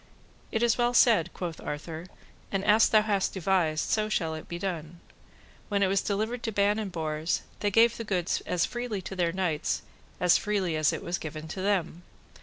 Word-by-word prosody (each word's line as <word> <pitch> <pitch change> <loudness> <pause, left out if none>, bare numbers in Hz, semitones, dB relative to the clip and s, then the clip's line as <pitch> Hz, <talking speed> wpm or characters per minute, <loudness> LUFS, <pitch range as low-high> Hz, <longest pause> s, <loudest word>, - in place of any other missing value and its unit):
It 225 0 0
is 240 0 +2
well 240 0 +2
said, 185 -9 +5
quoth 170 -3 -5
Arthur, 160 +3 -6 0.4
and 195 0 -1
as 215 +1 +5
thou 215 -1 +5
hast 205 -3 0
devised, 175 -4 +1
so 215 0 +1
shall 165 -6 0
it 155 - -7
be 170 - -5
done. 170 -3 -5 0.7
When 200 -1 +2
it - - +4
was 195 +1 +2
delivered 220 +4 -2
to 225 - -2
Ban 205 +1 +2
and 205 -3 -4
Bors, 160 -1 -2 0.2
they 205 - +1
gave 230 +3 +5
the 230 - -4
goods 180 -5 -1
as 175 - +1
freely 240 -5 -4
to 190 - -6
their 175 -2 +1
knights 170 -4 -1 0.4
as 180 -1 +5
freely 195 -6 -1
as 155 -1 +3
it - - -5
was 175 -2 -2
given 155 0 -6
to 185 - -5
them. 185 -4 0
190 Hz, 200 wpm, -28 LUFS, 165-210 Hz, 0.7 s, said